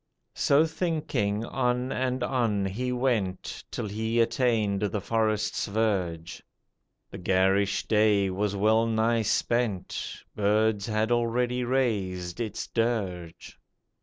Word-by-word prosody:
So 145 +3 +3
thinking, 150 - -1
on 125 0 -1
and 130 -1 -1
on 115 -6 0
he 120 +7 -2
went, 120 -8 -1
Till 115 - -4
he 110 +3 -1
attained 115 -4 +1
the 105 0 -1
forest's 110 +1 0
verge, 95 -6 -1 0.7
The - - -8
garish 95 +2 +2
day 105 -3 +3
was 100 +2 -1
well 110 +3 +3
nigh 115 +1 +2
spent, 110 -2 -1
Birds 105 0 +1
had 110 +1 0
already 120 +1 +1
raised 100 -9 -1
its 110 -3 -3
dirge. 95 -8 -3
110 Hz, 110 wpm, -27 LUFS, 100-120 Hz, 0.7 s, So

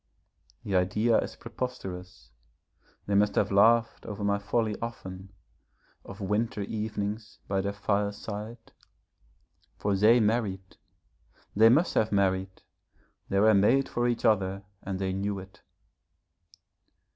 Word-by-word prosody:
The 100 - -2
idea 105 +6 +2
is - - -4
preposterous, 95 - -7 0.7
they 100 - -2
must 105 +1 +3
have 100 - +1
laughed 115 +3 +4
over 105 -2 -5
my 100 0 +1
folly 110 +1 -1
often, 95 -5 -7 0.7
of - - -11
winter 105 +2 -1
evenings 105 +1 -4
by 95 -1 0
their 100 +1 -2
fireside. 105 +2 -3 1.1
For 100 -1 0
they 110 +5 +5
married, 105 -4 -1 0.8
they 110 +2 +7
must 155 +9 +3
have 110 - +1
married, 95 -1 0 0.7
they 100 - +1
were 110 +2 +5
made 115 +7 +4
for 120 0 -1
each 120 -1 -1
other 100 -2 +1 0.2
and 95 -1 -4
they 95 -1 -2
knew 100 +1 -2
it. 95 0 -11
100 Hz, 120 wpm, -28 LUFS, 95-110 Hz, 1.1 s, they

